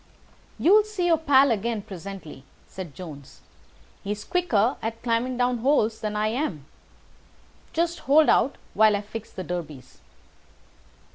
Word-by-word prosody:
"You'll 415 +5 +5
see 415 -4 -3
your 330 -2 +3
pal 280 -3 +5
again 225 0 -1
presently," 190 -7 -9 0.2
said 180 -7 -9
Jones. 150 -7 -10 0.6
"He's 205 +1 -4
quicker 255 - +1
at 225 +1 -5
climbing 240 +1 0
down 245 -1 +1
holes 230 -4 +2
than 210 -1 -3
I 215 +1 +1
am. 220 - -3 1.1
Just 340 +1 -1
hold 305 +2 +6
out 270 - +3 0.2
while 215 0 +5
I 205 - -2
fix 215 +1 -8
the 185 - -6
derbies." 155 -8 -7
225 Hz, 135 wpm, -25 LUFS, 195-280 Hz, 1.1 s, hold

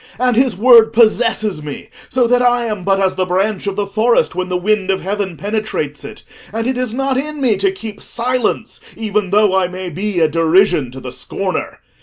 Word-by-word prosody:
And 250 -1 +2
his 255 0 +2
word 230 0 +6
possesses 220 -5 +2
me 150 -2 -8 0.2
so 250 -1 +2
that 245 +1 +2
I 245 -1 +2
am 210 -5 -4
but 195 +1 +1
as 190 -1 +1
the 185 0 -1
branch 195 +2 -1
of 200 - -2
the 205 0 -1
forest 215 +2 +1
when 185 +1 -3
the 180 - 0
wind 195 +1 0
of 190 0 0
heaven 195 -2 -3
penetrates 205 -9 -3
it, - - -10 0.3
and 225 +2 -3
it 260 +1 0
is 250 -2 -2
not 270 +2 -1
in 300 +1 -5
me 250 -6 +2
to 195 0 +1
keep 205 +2 -9
silence, 240 -1 -2 0.2
even 210 -3 -1
though 205 -1 +3
I 190 -1 +2
may 180 0 -6
be 195 +2 -2
a 160 - +4
derision 165 -2 +2
to 130 - -8
the 125 -1 -7
scorner. - - -4
210 Hz, 210 wpm, -17 LUFS, 185-235 Hz, 0.3 s, word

